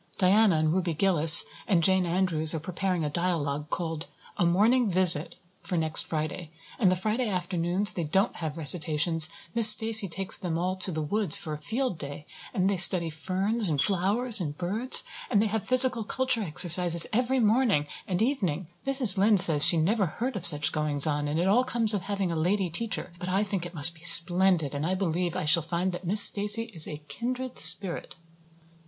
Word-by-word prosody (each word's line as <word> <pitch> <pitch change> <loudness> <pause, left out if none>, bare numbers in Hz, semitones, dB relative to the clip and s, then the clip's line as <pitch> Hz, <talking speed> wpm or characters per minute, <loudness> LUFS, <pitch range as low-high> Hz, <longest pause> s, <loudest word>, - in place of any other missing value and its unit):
Diana 195 0 +2
and 155 0 -1
Ruby 180 -3 -3
Gillis 165 -2 +4 0.2
and 180 -6 0
Jane 190 0 +1
Andrews 165 -3 0
are - - -4
preparing 180 +1 -5
a - - -4
dialogue, 150 -4 -4
called 165 -3 -6 0.3
'A 175 -4 0
Morning 220 +7 0
Visit,' 175 -3 +2 0.3
for 180 +1 -6
next 160 -1 0
Friday. 155 +1 -6 0.3
And 190 -6 +1
the - - -1
Friday 215 +6 -4
afternoons 180 +1 -2
they 170 - -5
don't 190 +8 -2
have 160 -2 -7
recitations 160 0 -1 0.2
Miss 230 -2 +5
Stacy 220 -2 +4
takes 190 +2 +1
them 170 -3 -5
all 180 +2 -3
to 185 0 -1
the 155 -2 -5
woods 205 +6 +3
for 155 - -8
a 150 - -8
'field' 230 - -5
day 145 +1 -10 0.3
and 190 -5 -2
they 200 -1 -2
study 175 -2 +4
ferns 190 +6 -3
and 150 -3 -3
flowers 205 - 0
and 150 -3 -7
birds. 210 +9 +5 0.3
And 210 - 0
they 215 - 0
have 215 0 -5
physical 255 -2 +3
culture 260 +1 -3
exercises 175 -1 +4
every 255 +3 -1
morning 220 - 0 0.2
and 185 +2 -3
evening. 185 - -4 0.2
Mrs. 255 -8 +2
Lynde 205 0 +2
says 155 -4 +4
she 170 - +5
never 195 +5 -1
heard 240 +9 -6
of 190 - +5
such 150 -1 +1
goings 150 -2 -1
on 145 -1 -3
and 150 +2 -4
it 175 - -2
all 230 +6 +1
comes 230 -3 -1
of 205 - -3
having 195 -2 -5
a - - -5
lady 180 +3 -3
teacher. 220 -1 -6
But 180 -1 -7
I 195 +3 -1
think 195 -4 -6
it 175 - -16
must 160 +2 +5
be 160 - -20
splendid 170 -2 +2
and 145 +1 -6
I 180 +4 -3
believe 175 -2 -4
I - - -5
shall 155 +2 +2
find 170 +3 -4
that 175 0 -10
Miss 205 +3 +5
Stacy 210 +3 +1
is 160 -3 0
a 150 -1 -10
kindred 255 +4 -6
spirit." 170 +3 +4
180 Hz, 195 wpm, -25 LUFS, 160-210 Hz, 0.3 s, Miss